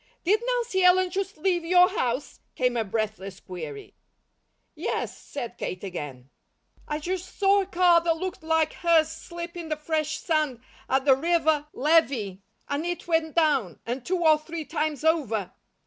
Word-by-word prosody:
"Did 420 +6 +3
Nancy 475 -6 0
Ellen 360 0 +5
just 390 0 -3
leave 350 +1 +1
your 360 +2 +6
house?" 250 -2 -2 0.2
came 250 -1 +1
a 230 - +1
breathless 200 -2 -3
query. 160 -7 -8 0.8
"Yes," - - -3
said 245 -5 -7
Kate 185 - -4
again. 145 -9 -7 0.6
"I 300 - -2
just 365 +4 -5
saw 400 0 +4
a 380 - -5
car 350 -2 +4
that 330 -1 +1
looked 370 +1 -5
like 320 -1 +1
hers 330 -3 +3
slip 340 +1 -8
in 335 -2 -6
the 310 - 0
fresh 310 0 -2
sand 305 -7 0 0.3
at 265 0 +2
the 270 -2 +6
river 315 0 +1
levee, 260 - +2 0.3
and 285 +2 -2
it 350 +1 -4
went 325 -2 +1
down, 285 - +2
and 245 +2 -3
two 360 +2 -1
or 310 -1 +6
three 320 0 -6
times 305 -3 -2
over." 260 - +1
315 Hz, 165 wpm, -26 LUFS, 255-345 Hz, 0.8 s, your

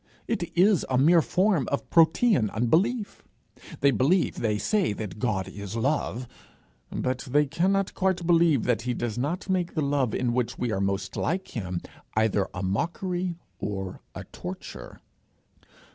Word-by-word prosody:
It 175 -7 -3
is 190 0 +5
a 130 - +2
mere 165 +6 +6
form 185 - +1
of 140 - -1
Protean 165 - +4
unbelief. 195 - +1 0.6
They 140 - +5
believe, 145 - +2
they 105 -2 0
say, 195 - +1
that 105 -2 -6
God 105 -6 -1
is 100 0 -7
love; 130 0 -1 0.6
but 130 0 -1
they 145 +3 +4
cannot 185 +6 +1
quite 185 -2 0
believe 165 -6 +4
that 120 -3 +1
he 125 0 -2
does 120 -1 -3
not 155 +10 -2
make 185 -2 -1
the 155 - +1
love 140 -5 +1
in 125 -2 0
which 125 -1 -1
we 120 -2 -1
are 95 - -1
most 95 -1 -2
like 185 +4 -1
him, 90 -6 -4 0.4
either 110 -3 +2
a 90 - -5
mockery 175 - -2 0.2
or 95 -2 -4
a - - -6
torture. - - -8
140 Hz, 155 wpm, -26 LUFS, 110-175 Hz, 0.6 s, mere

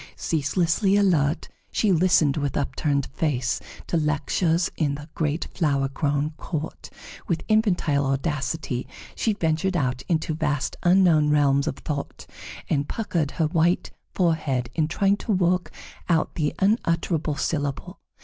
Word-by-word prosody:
Ceaselessly 170 +6 +1
alert, 165 -8 +2 0.2
she 215 - +2
listened 165 -5 +4
with 145 -2 -1
upturned 140 0 0
face 130 -6 0 0.3
to 170 - 0
lectures 160 +3 +1
in 145 -3 0
the 145 +1 -9
great 155 0 -1
flower 140 -5 +1
grown 145 +2 -1
court; 160 -2 -5 0.4
with 165 -2 -1
infantile 175 -10 +2
audacity 135 -1 -2 0.3
she 220 - 0
ventured 170 +1 0
out 125 -4 -1
into 160 -2 0
vast 150 -3 -1
unknown 175 -4 +4
realms 140 -1 +3
of - - -1
thought, 145 -2 -5 0.4
and 145 -1 0
puckered 170 -9 -1
her 160 - +2
white 170 +2 +1 0.2
forehead 150 -9 0
in 155 -2 +1
trying 195 +4 +2
to 220 - -4
work 180 -2 +1 0.4
out 165 -2 +2
the 155 0 -1
unutterable 170 -6 +1
syllable. 145 -2 -3
155 Hz, 130 wpm, -24 LUFS, 145-175 Hz, 0.4 s, listened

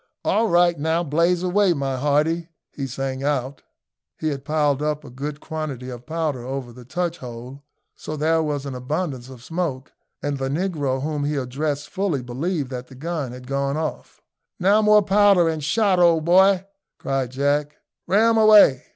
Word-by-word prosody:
"All 225 +1 +2
right! 175 -2 +3
now 160 +3 0
blaze 170 +3 +1
away, 185 0 +3
my 135 -3 -2
hearty!" 150 +5 0 0.2
he 135 -2 -5
sang 135 +1 -4
out. 140 -1 -2 0.6
He 155 - -1
had 140 -2 -4
piled 145 -1 +1
up 150 0 -1
a 130 - -11
good 145 +3 -5
quantity 145 -6 -5
of 120 +2 -10
powder 155 -6 -2
over 130 -1 -5
the 125 0 -13
touch 175 +5 -3
hole, 125 +2 -9 0.3
so 155 - -7
there 160 +2 +2
was 145 -3 -2
an 140 - -5
abundance 130 0 -4
of 125 -2 -12
smoke, 160 -5 -3 0.3
and 145 -1 -2
the 135 0 -2
negro 145 -5 -1
whom 150 -1 -2
he 150 +1 -1
addressed 145 +2 -3
fully 185 -9 -1
believed 140 +3 -3
that 125 -1 -6
the 130 - -14
gun 150 -2 -4
had 125 0 -10
gone 140 +2 -1
off. 155 -1 -5 0.4
"Now 200 +4 +4
more 210 -1 +5
powder 195 -3 +4
and 160 -2 -2
shot, 190 +4 +2
old 165 -3 +4
boy," 190 +2 +5 0.3
cried 135 -2 -2
Jack; 145 +3 0 0.3
"ram 225 +4 +4
away!" 210 -12 +6
150 Hz, 175 wpm, -22 LUFS, 135-170 Hz, 0.6 s, away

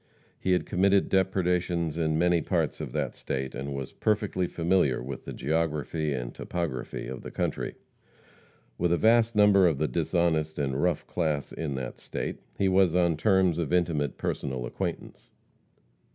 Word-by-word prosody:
He 95 - +1
had 90 - +1
committed 100 +2 +2
depredations 90 -3 +1
in 80 -2 0
many 85 0 +3
parts - - -1
of - - -5
that - - -2
state, 65 0 -4
and 70 +1 -4
was 70 -2 -5
perfectly 105 -4 0
familiar 85 -7 +1
with 65 +2 -7
the - - -5
geography 75 0 -1
and 60 -3 -3
topography 85 -8 -4
of 65 - -6
the - - -7
country. - - -2 1.0
With 85 0 +2
a 85 - +3
vast 115 +4 +4
number 100 -3 +6
of 80 -5 +1
the 75 +2 +1
dishonest 80 -1 0
and 70 -1 -1
rough 90 -3 +1
class 75 -5 -1
in 75 -4 -3
that 65 -2 -5
state, - - -4 0.2
he 100 - +2
was 95 -2 +4
on 85 -2 +3
terms 95 0 +3
of 85 - -2
intimate 80 -6 +1
personal 65 -3 -3
acquaintance. - - -5
85 Hz, 160 wpm, -28 LUFS, 75-90 Hz, 1.0 s, number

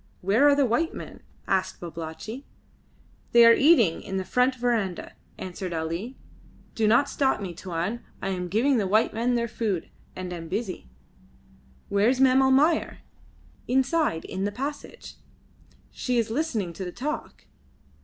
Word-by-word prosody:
"Where 210 +10 +4
are 285 - +5
the 285 -1 +3
white 255 +8 0
men?" - - -9 0.3
asked 185 -1 0
Babalatchi. 170 - -7 0.9
"They 235 0 +8
are 230 - +9
eating 250 - +4
in 195 -2 -4
the 190 - -3
front 250 +6 +2
verandah," 230 -7 -1 0.2
answered 185 -1 -6
Ali. 165 +10 -4 0.6
"Do 220 -1 +1
not 240 +6 +4
stop 270 -2 +1
me, 190 -4 -5
Tuan. 180 +6 -3 0.2
I 195 - -3
am 180 -2 -3
giving 240 +9 +2
the 205 -4 0
white 215 +4 +2
men 240 +2 0
their 235 0 0
food 210 -7 -3 0.2
and 180 -1 -5
am 165 -1 -7
busy." 190 - -4 1.0
"Where's 220 +6 +2
Mem 265 0 +5
Almayer?" 275 +5 +2 0.7
"Inside 265 - +1
in 190 - -4
the 205 - -1
passage. 280 +7 -7 0.7
She 250 -1 -2
is 230 -1 0
listening 230 - -2
to 190 - -6
the 180 - -5
talk." 300 - -5
220 Hz, 150 wpm, -26 LUFS, 185-260 Hz, 1.0 s, are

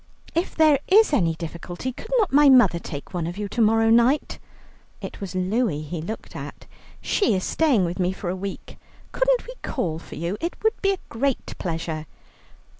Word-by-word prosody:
"If 335 +3 -1
there 310 -3 +5
is 420 -3 +5
any 170 - +2
difficulty, 175 +8 -6
could 445 - -11
not 420 - +1
my 290 0 +7
mother 240 -10 +6
take 145 -1 -8
one 170 -2 -2
of 175 +2 -6
you 205 0 -3
to 235 - -1
morrow 225 +1 +4
night?" 235 +6 +3 0.6
(It - - -8
was 190 -3 -6
Louie 185 -4 0
he 155 +2 -5
looked 215 +8 -7
at.) - - -8 0.4
"She 395 - +2
is 185 - -1
staying 275 - +2
with 175 +2 -4
me 180 0 +1
for 190 0 -7
a - - -3
week. 195 +1 -7 0.3
Couldn't - - +1
we - - -8
call 165 - -2
for - - -11
you? 170 +6 -3
It 340 - -2
would 440 +1 +1
be 395 - +3
a - - -4
great 265 +3 -2
pleasure." 160 -2 -4
210 Hz, 190 wpm, -24 LUFS, 175-285 Hz, 0.6 s, my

